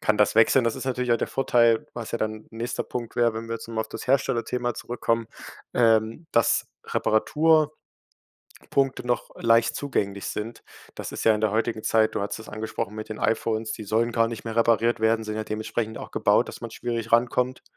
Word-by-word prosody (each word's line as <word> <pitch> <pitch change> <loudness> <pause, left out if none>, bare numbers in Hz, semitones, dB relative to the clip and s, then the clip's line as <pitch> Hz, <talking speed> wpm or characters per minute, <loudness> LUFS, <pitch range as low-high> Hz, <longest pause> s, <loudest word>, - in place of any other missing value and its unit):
kann 110 - +2
das 105 - +3
wechseln. 115 +3 +6
Das 115 - 0
ist - - -5
natürlich 125 -2 -1
auch - - +4
der - - -2
Vorteil, 115 -4 +3
was 120 -2 -6
ja 115 - -1
dann 110 0 -3
nächster 115 +2 -3
'n - - -27
Punkt 120 -2 -5
wäre, 120 -2 +3
wenn 115 +1 -5
wir 115 - -2
jetzt 115 - -7
mal 115 -1 -2
auf - - -4
das - - -7
Herstellerthema 125 -2 +1
zurückkommen. 115 -1 -2 0.5
Ähm, 115 +5 +2
dass 115 - +2 0.2
Reparaturpunkte 155 +7 +2 1.2
noch 120 -2 -1
leicht 115 0 +3
zugänglich 100 -8 -2
sind. 110 +3 -5 0.3
Das - - -6
ist - - -4
ja 110 -1 +6
in - - -5
der 110 -2 +1
heutigen 110 0 -1
Zeit 110 -1 +3
du - - 0
hattest 100 +2 -3
es 110 - -11
angesprochen 110 -1 -4
mit 110 0 -6
den 110 - -6
iPhones, 110 0 0
die 110 - -6
sollen 115 +3 +1
gar 115 0 +3
nicht 115 -1 -7
mehr 115 -1 -5
repariert 115 0 +3
werden, 110 0 +2
sind 110 0 -4
ja 110 - -2
dementsprechend 110 +1 -3
auch - - -8
gebaut, - - +2
dass - - -9
man - - -6
schwierig 115 -1 -4
rankommt, 125 +2 +2
115 Hz, 205 wpm, -25 LUFS, 110-120 Hz, 1.2 s, wechseln